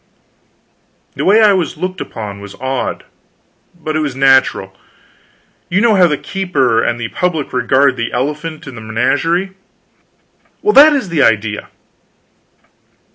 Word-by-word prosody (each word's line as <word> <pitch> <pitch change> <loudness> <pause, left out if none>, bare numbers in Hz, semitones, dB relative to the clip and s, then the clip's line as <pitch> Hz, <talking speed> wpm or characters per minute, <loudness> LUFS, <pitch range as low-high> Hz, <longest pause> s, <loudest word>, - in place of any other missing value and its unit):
The - - -4
way 215 +4 +5
I 210 -2 +5
was 180 -4 -2
looked 185 0 -4
upon 105 -2 -7
was 100 0 -11
odd, 130 0 -4 0.8
but 155 -1 -4
it - - +1
was 145 -4 -3
natural. 130 -8 +2 0.9
You 185 - +1
know 230 0 +3
how 180 -2 +5
the 150 -3 -1
keeper 140 - 0
and 120 - -1
the 115 -1 -4
public 170 -5 -2
regard 130 +2 +2
the 115 0 -3
elephant 150 +5 -4
in 135 - -9
the 110 - -9
menagerie: 165 - -1 1.1
well, 420 - +2
that 300 +2 +8
is 265 -10 -2
the 165 -4 0
idea. 105 -3 0
145 Hz, 140 wpm, -15 LUFS, 120-180 Hz, 1.1 s, that